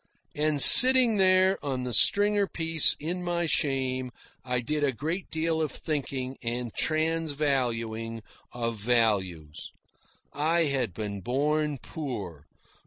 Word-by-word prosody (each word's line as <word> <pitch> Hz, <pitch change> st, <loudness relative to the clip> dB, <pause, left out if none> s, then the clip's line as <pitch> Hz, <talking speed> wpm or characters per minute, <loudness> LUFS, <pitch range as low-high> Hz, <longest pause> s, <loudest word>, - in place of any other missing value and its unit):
And 150 Hz, 0 st, -2 dB
sitting 250 Hz, -, +9 dB
there 185 Hz, 0 st, +1 dB
on 130 Hz, -3 st, -5 dB
the 125 Hz, -1 st, -5 dB
stringer 205 Hz, -, +2 dB
piece 165 Hz, -3 st, 0 dB
in 175 Hz, +4 st, -6 dB
my 175 Hz, -1 st, -3 dB
shame, 130 Hz, -4 st, -3 dB, 0.3 s
I 125 Hz, -1 st, -3 dB
did 150 Hz, +5 st, -4 dB
a 140 Hz, -, 0 dB
great 160 Hz, -, -6 dB
deal 160 Hz, 0 st, -3 dB
of 155 Hz, -, -3 dB
thinking 135 Hz, -4 st, -6 dB
and 120 Hz, 0 st, -5 dB
transvaluing 135 Hz, -8 st, -3 dB, 0.3 s
of 115 Hz, -2 st, -5 dB
values. 100 Hz, -9 st, -3 dB, 0.6 s
I 160 Hz, +4 st, -1 dB
had 130 Hz, -, -3 dB
been 100 Hz, -1 st, -7 dB
born 150 Hz, +6 st, -2 dB
poor. 105 Hz, -, -9 dB
140 Hz, 120 wpm, -25 LUFS, 120-160 Hz, 0.6 s, sitting